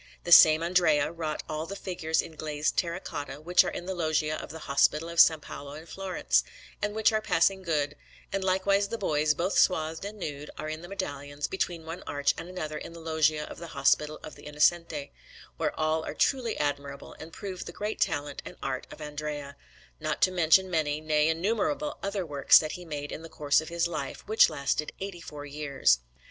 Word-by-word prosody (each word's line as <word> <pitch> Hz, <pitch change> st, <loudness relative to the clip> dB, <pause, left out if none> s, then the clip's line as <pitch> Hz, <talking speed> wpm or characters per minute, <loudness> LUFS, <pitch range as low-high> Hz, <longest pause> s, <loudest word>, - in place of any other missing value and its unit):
The 175 Hz, -, -4 dB
same 160 Hz, -2 st, +9 dB
Andrea 170 Hz, -4 st, +3 dB
wrought 160 Hz, -2 st, -4 dB
all 155 Hz, +1 st, -4 dB
the 200 Hz, -, -6 dB
figures 175 Hz, -5 st, -1 dB
in 160 Hz, -, -11 dB
glazed 150 Hz, -1 st, -2 dB
terra 170 Hz, 0 st, 0 dB
cotta 145 Hz, -6 st, -6 dB
which 175 Hz, +4 st, +4 dB
are -, -, -2 dB
in 175 Hz, -, -6 dB
the 190 Hz, -, -3 dB
Loggia 155 Hz, -3 st, 0 dB
of -, -, -7 dB
the 160 Hz, +1 st, -9 dB
Hospital 150 Hz, +3 st, +2 dB
of 170 Hz, 0 st, -3 dB
S. -, -, +10 dB
Paolo 140 Hz, -1 st, -8 dB
in 155 Hz, +2 st, -9 dB
Florence, 170 Hz, -, 0 dB, 0.4 s
and 205 Hz, 0 st, -1 dB
which 220 Hz, 0 st, +4 dB
are 215 Hz, 0 st, +1 dB
passing 190 Hz, -1 st, +2 dB
good; 150 Hz, -5 st, -1 dB, 0.4 s
and 195 Hz, -, -1 dB
likewise 195 Hz, +2 st, +2 dB
the 230 Hz, -, -4 dB
boys, 150 Hz, -6 st, +1 dB
both 180 Hz, +6 st, +1 dB
swathed 160 Hz, -2 st, +2 dB
and 205 Hz, +2 st, -6 dB
nude, 150 Hz, -5 st, -6 dB
that -, -, -14 dB
are -, -, -4 dB
in 155 Hz, +1 st, -5 dB
the 175 Hz, -, -9 dB
medallions 145 Hz, -6 st, -4 dB
between 175 Hz, -3 st, -3 dB
one 165 Hz, +3 st, -6 dB
arch 145 Hz, 0 st, +1 dB
and 175 Hz, -, -8 dB
another 155 Hz, -4 st, -4 dB
in -, -, -9 dB
the 170 Hz, -, -10 dB
Loggia 155 Hz, -2 st, +1 dB
of -, -, -9 dB
the 170 Hz, -1 st, -9 dB
Hospital 150 Hz, 0 st, +2 dB
of 155 Hz, -, -8 dB
the -, -, -12 dB
Innocenti, 150 Hz, -1 st, +1 dB, 0.5 s
which -, -, 0 dB
are -, -, -12 dB
all 155 Hz, 0 st, +1 dB
truly 250 Hz, -5 st, +1 dB
admirable 140 Hz, -1 st, -3 dB
and 160 Hz, +1 st, -9 dB
prove 190 Hz, 0 st, -6 dB
the -, -, -7 dB
great 210 Hz, +4 st, -4 dB
talent 145 Hz, -1 st, -1 dB
and -, -, -9 dB
art 130 Hz, -1 st, -3 dB
of -, -, -11 dB
Andrea; 150 Hz, -1 st, -5 dB, 0.4 s
not 155 Hz, 0 st, -2 dB
to 185 Hz, -, +5 dB
mention 185 Hz, +1 st, +4 dB
many, 155 Hz, -3 st, 0 dB
nay, 155 Hz, 0 st, +2 dB
innumerable 225 Hz, -, -1 dB
other 200 Hz, -2 st, -2 dB
works 145 Hz, -3 st, +6 dB
that 155 Hz, -1 st, +1 dB
he 180 Hz, -, -7 dB
made 145 Hz, -2 st, -5 dB
in -, -, -6 dB
the 165 Hz, -, -10 dB
course 145 Hz, -1 st, +2 dB
of 160 Hz, -, -8 dB
his 170 Hz, 0 st, 0 dB
life, 150 Hz, -5 st, -5 dB
which 220 Hz, +1 st, +6 dB
lasted 140 Hz, +2 st, -2 dB
eighty 190 Hz, -3 st, -6 dB
four 145 Hz, -3 st, -8 dB
years. 140 Hz, -, +1 dB
160 Hz, 210 wpm, -28 LUFS, 150-180 Hz, 0.5 s, S